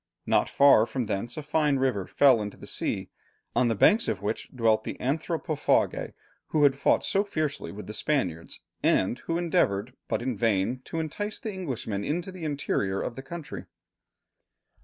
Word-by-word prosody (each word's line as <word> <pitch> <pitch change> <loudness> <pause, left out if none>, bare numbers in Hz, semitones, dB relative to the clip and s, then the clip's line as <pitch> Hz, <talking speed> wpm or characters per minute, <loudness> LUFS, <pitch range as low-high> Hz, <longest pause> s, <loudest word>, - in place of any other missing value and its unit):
Not - - +2
far 140 -5 +6
from 125 +2 -2
thence 110 +3 -3
a 155 - -4
fine 150 -1 +2
river 130 -8 0
fell 135 -6 +5
into 105 -1 -6
the - - -11
sea, - - -2 0.4
on 125 - +3
the 115 - +1
banks 215 - +4
of 95 - -2
which 105 +2 -3
dwelt 115 -3 +2
the - - -5
anthropophagi 155 +2 0 0.3
who 155 -2 +1
had 140 -2 +5
fought 140 - +2
so 195 - +2
fiercely 155 -8 -3
with 105 +1 -8
the 105 - -7
Spaniards, 90 - -2 0.2
and 95 +7 +2
who 165 - -2
endeavoured, 125 - +1
but - - -1
in 125 -1 -1
vain, 115 +2 +1
to 165 - -4
entice 205 +7 -3
the 220 - -5
Englishmen 125 - -4
into 170 - -2
the 180 -3 -7
interior 100 -10 -1
of 120 - -4
the 135 - -6
country. 160 +3 -7
135 Hz, 175 wpm, -27 LUFS, 110-155 Hz, 0.4 s, far